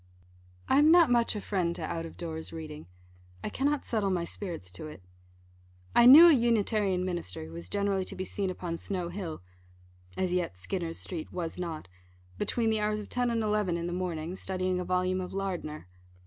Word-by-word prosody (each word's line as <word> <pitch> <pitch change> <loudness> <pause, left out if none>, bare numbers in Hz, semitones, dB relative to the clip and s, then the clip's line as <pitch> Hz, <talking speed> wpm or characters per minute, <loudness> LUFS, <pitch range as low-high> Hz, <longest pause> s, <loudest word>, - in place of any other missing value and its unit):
I 270 - +4
am 300 +1 +6
not 335 -5 +6
much 235 -2 +3
a 210 - -3
friend 180 -5 -1
to - - -5
out 165 -1 -3
of - - -13
doors 160 -2 -6
reading. 155 -2 -8 0.6
I - - -2
cannot 285 +1 0
settle 215 -4 0
my 180 -2 0
spirits 170 - -6
to 90 +12 -7
it. 150 -11 -11 0.9
I 240 - +8
knew 310 +7 +11
a 335 - +8
Unitarian 215 -6 +2
minister, 170 - -4
who 80 - -11
was 85 +1 -8
generally 200 -1 0
to - - -7
be 185 - -4
seen 195 0 -2
upon 175 -2 -4
Snow 180 -1 -3
hill 175 - -6 0.7
(as 185 -1 0
yet 175 - -1
Skinner's 165 - -4
street 170 -4 -6
was 170 -1 -4
not), 165 - -5 0.5
between 230 -2 +1
the 220 - +1
hours 210 0 0
of 210 - -8
ten 245 -1 0
and 230 -1 0
eleven 210 -5 +1
in 170 - -3
the 175 - -3
morning, 175 -1 -3
studying 185 -1 -2
a - - -2
volume 185 +1 0
of 180 - -6
Lardner. 180 - -4
185 Hz, 195 wpm, -29 LUFS, 170-210 Hz, 0.9 s, knew